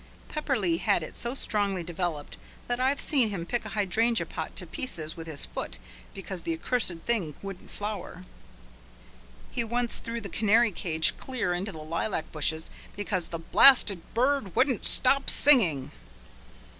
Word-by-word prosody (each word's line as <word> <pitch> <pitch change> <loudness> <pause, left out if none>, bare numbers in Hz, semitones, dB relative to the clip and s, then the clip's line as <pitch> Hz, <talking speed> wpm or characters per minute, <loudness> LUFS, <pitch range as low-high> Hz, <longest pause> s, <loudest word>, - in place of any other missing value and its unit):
Pepperleigh 215 - 0
had 170 - +2
it - - -8
so 240 +2 -4
strongly 200 -7 -1
developed 170 -3 -4 0.3
that 245 0 -1
I've 265 +2 +2
seen 260 -7 +2
him 185 -5 -4
kick 240 +6 -2
a - - -5
hydrangea 220 +3 +1
pot - - -6
to - - -4
pieces 160 -11 -4
with 165 -1 -8
his 155 -3 -3
foot - - -5 0.4
because 190 -2 -6
the 165 - -2
accursed 185 0 0
thing 190 -11 0
wouldn't 195 -2 -8
flower. 200 -3 -6 1.3
He 235 - -1
once 235 +1 -1
threw 230 0 -5
the 205 - -7
canary 220 +4 +3
cage 160 -3 0
clear 245 -9 -2
into 190 +4 -3
the 155 -4 -9
lilac 165 +2 -3
bushes 160 +1 -2 0.2
because 195 -4 -2
the 165 - -5
"blasted 200 +2 +6
bird 250 -5 +1
wouldn't 255 -4 +2
stop 275 +1 +3
singing." 180 - +5
200 Hz, 155 wpm, -28 LUFS, 170-240 Hz, 1.3 s, blasted